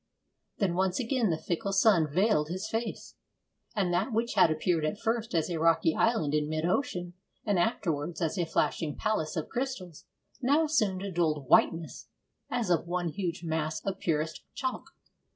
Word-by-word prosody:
Then 195 Hz, -4 st, +1 dB
once 185 Hz, +1 st, +1 dB
again 245 Hz, -3 st, +1 dB
the 160 Hz, -, +1 dB
fickle 175 Hz, +4 st, -2 dB
sun 190 Hz, -7 st, +4 dB
veiled 175 Hz, -3 st, +2 dB
his 185 Hz, +2 st, -3 dB
face, 225 Hz, 0 st, -4 dB, 0.6 s
and 190 Hz, -4 st, +1 dB
that 180 Hz, +9 st, +1 dB
which 230 Hz, +2 st, 0 dB
had 185 Hz, -5 st, +5 dB
appeared 160 Hz, +1 st, 0 dB
at 155 Hz, +6 st, -1 dB
first 225 Hz, -3 st, -1 dB
as 160 Hz, -, +2 dB
a 170 Hz, -3 st, -3 dB
rocky 165 Hz, 0 st, +3 dB
island 220 Hz, -11 st, +1 dB
in 150 Hz, 0 st, +1 dB
mid 155 Hz, +1 st, -1 dB
ocean, 175 Hz, -3 st, -1 dB, 0.3 s
and 205 Hz, -4 st, +2 dB
afterwards 165 Hz, -5 st, -1 dB
as 165 Hz, 0 st, -1 dB
a 175 Hz, -4 st, -1 dB
flashing 160 Hz, -1 st, 0 dB
palace 215 Hz, -8 st, -1 dB
of 160 Hz, -, -3 dB
crystals, 240 Hz, -, -4 dB, 0.4 s
now 285 Hz, +5 st, +3 dB
assumed 215 Hz, -12 st, +1 dB
a 200 Hz, -, -4 dB
dulled 155 Hz, -6 st, 0 dB
whiteness 165 Hz, +4 st, +2 dB, 0.4 s
as 235 Hz, -6 st, -1 dB
of 170 Hz, 0 st, +1 dB
one 175 Hz, 0 st, -1 dB
huge 175 Hz, -1 st, -4 dB
mass 160 Hz, -1 st, -1 dB
of 195 Hz, -1 st, -2 dB
purest 160 Hz, -1 st, -1 dB
chalk. 260 Hz, -1 st, -4 dB
175 Hz, 170 wpm, -29 LUFS, 160-215 Hz, 0.6 s, had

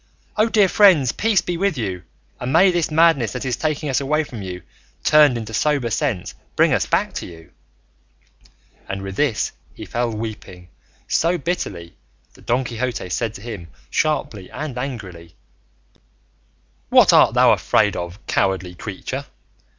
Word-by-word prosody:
O 215 Hz, +1 st, +2 dB
dear 210 Hz, -3 st, +4 dB
friends, 180 Hz, -, +5 dB
peace 220 Hz, -3 st, +1 dB
be 175 Hz, -1 st, -3 dB
with 195 Hz, -3 st, 0 dB
you, 95 Hz, -6 st, -3 dB, 0.4 s
and 125 Hz, -, -3 dB
may 185 Hz, +5 st, +5 dB
this 175 Hz, -2 st, 0 dB
madness 155 Hz, -7 st, +3 dB
that 125 Hz, +1 st, -5 dB
is 125 Hz, -2 st, 0 dB
taking 155 Hz, -1 st, -2 dB
us 135 Hz, 0 st, 0 dB
away 150 Hz, +3 st, +1 dB
from 120 Hz, -7 st, -9 dB
you, 90 Hz, -2 st, -7 dB, 0.4 s
turned 150 Hz, -5 st, +5 dB
into 110 Hz, -1 st, -6 dB
sober 140 Hz, -1 st, 0 dB
sense, 95 Hz, -3 st, -2 dB, 0.2 s
bring -, -, +4 dB
us -, -, +1 dB
back -, -, 0 dB
to -, -, -5 dB
you." 80 Hz, -2 st, -14 dB, 1.4 s
And 95 Hz, 0 st, -4 dB
with 95 Hz, -1 st, -6 dB
this 125 Hz, -3 st, 0 dB, 0.2 s
he -, -, -8 dB
fell 120 Hz, 0 st, -1 dB
weeping 105 Hz, -5 st, -7 dB, 0.4 s
so 170 Hz, +2 st, +1 dB
bitterly, 100 Hz, -, -4 dB, 0.4 s
that -, -, -20 dB
Don 125 Hz, +3 st, +2 dB
Quixote 120 Hz, -5 st, -4 dB
said 115 Hz, +4 st, -2 dB
to -, -, -9 dB
him, 105 Hz, -7 st, -7 dB, 0.2 s
sharply 110 Hz, -11 st, -1 dB
and 150 Hz, -4 st, -6 dB
angrily, 100 Hz, -, -7 dB, 1.5 s
"What -, -, +6 dB
art -, -, +5 dB
thou -, -, +6 dB
afraid 105 Hz, -2 st, +2 dB
of, 85 Hz, +3 st, -6 dB
cowardly 95 Hz, -2 st, 0 dB
creature? 85 Hz, -, -6 dB
120 Hz, 155 wpm, -21 LUFS, 95-155 Hz, 1.5 s, What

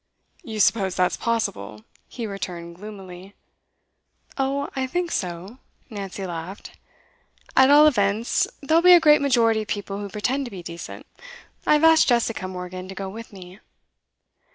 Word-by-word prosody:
'You 220 Hz, -2 st, -7 dB
suppose 195 Hz, -3 st, +2 dB
that's 180 Hz, -1 st, +1 dB
possible?' 110 Hz, -, -3 dB, 0.2 s
he 235 Hz, -, -6 dB
returned 175 Hz, -4 st, -6 dB
gloomily. 195 Hz, -2 st, -11 dB, 1.0 s
'Oh, 275 Hz, +1 st, -1 dB
I 265 Hz, -1 st, -1 dB
think 350 Hz, +5 st, -2 dB
so,' 185 Hz, +6 st, -4 dB, 0.3 s
Nancy 195 Hz, -2 st, -6 dB
laughed. 175 Hz, +2 st, -7 dB, 0.8 s
'At 265 Hz, 0 st, +6 dB
all 295 Hz, +1 st, +8 dB
events, 220 Hz, -5 st, +2 dB, 0.2 s
there'll 320 Hz, +4 st, +3 dB
be 360 Hz, +1 st, +8 dB
a 350 Hz, -, +9 dB
great 300 Hz, -2 st, +5 dB
majority 230 Hz, -5 st, +3 dB
of 215 Hz, -, -8 dB
people 200 Hz, -1 st, -4 dB
who 205 Hz, -1 st, -6 dB
pretend 250 Hz, +8 st, -2 dB
to -, -, -6 dB
be 185 Hz, -3 st, -8 dB
decent. 170 Hz, 0 st, -8 dB, 0.6 s
I -, -, +5 dB
have 300 Hz, +1 st, +3 dB
asked 325 Hz, -1 st, +6 dB
Jessica 230 Hz, -5 st, 0 dB
Morgan 185 Hz, 0 st, -7 dB
to 195 Hz, -, -9 dB
go 195 Hz, 0 st, -5 dB
with 225 Hz, +4 st, -10 dB
me. 185 Hz, 0 st, -12 dB
205 Hz, 155 wpm, -23 LUFS, 185-260 Hz, 1.0 s, a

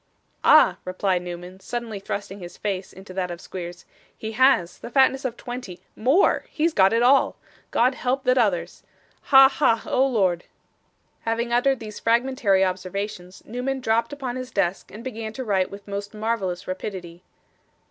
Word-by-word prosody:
'Ah!' -, -, +6 dB
replied 185 Hz, 0 st, 0 dB
Newman, 180 Hz, +1 st, -8 dB
suddenly 230 Hz, -1 st, -5 dB
thrusting 200 Hz, 0 st, -5 dB
his 175 Hz, -2 st, -10 dB
face 195 Hz, -3 st, -3 dB
into 190 Hz, 0 st, -12 dB
that 185 Hz, -1 st, -2 dB
of 175 Hz, -1 st, -6 dB
Squeers, 175 Hz, -1 st, -8 dB, 0.3 s
'he 220 Hz, -, -5 dB
has; 240 Hz, -6 st, +3 dB
the -, -, -8 dB
fatness 265 Hz, +1 st, +3 dB
of 240 Hz, -2 st, -3 dB
twenty! 245 Hz, -8 st, -7 dB, 0.2 s
more! 265 Hz, -, +3 dB
He's 320 Hz, +1 st, 0 dB
got 190 Hz, -6 st, +5 dB
it 230 Hz, +1 st, +2 dB
all. 270 Hz, +2 st, +4 dB, 0.3 s
God 250 Hz, +3 st, +3 dB
help 260 Hz, +2 st, -1 dB
that 255 Hz, 0 st, +3 dB
others. 180 Hz, -8 st, 0 dB, 0.4 s
Ha! 270 Hz, -1 st, +8 dB
ha! 265 Hz, -5 st, +1 dB
Oh 265 Hz, +1 st, +2 dB
Lord!' 190 Hz, -9 st, +1 dB, 0.7 s
Having 230 Hz, +1 st, -2 dB
uttered 265 Hz, +2 st, +2 dB
these 215 Hz, -2 st, -8 dB
fragmentary 230 Hz, -5 st, +2 dB
observations, 185 Hz, 0 st, -5 dB
Newman 250 Hz, +4 st, -3 dB
dropped 230 Hz, 0 st, +1 dB
upon 260 Hz, -3 st, -4 dB
his 255 Hz, 0 st, -6 dB
desk 195 Hz, -4 st, -1 dB
and 215 Hz, +3 st, -10 dB
began 225 Hz, -4 st, -5 dB
to 260 Hz, -, -5 dB
write 195 Hz, -5 st, +1 dB
with 200 Hz, +1 st, -11 dB
most 200 Hz, +1 st, -5 dB
marvellous 210 Hz, -5 st, -2 dB
rapidity. 185 Hz, -2 st, -6 dB
215 Hz, 160 wpm, -24 LUFS, 185-250 Hz, 0.7 s, Ha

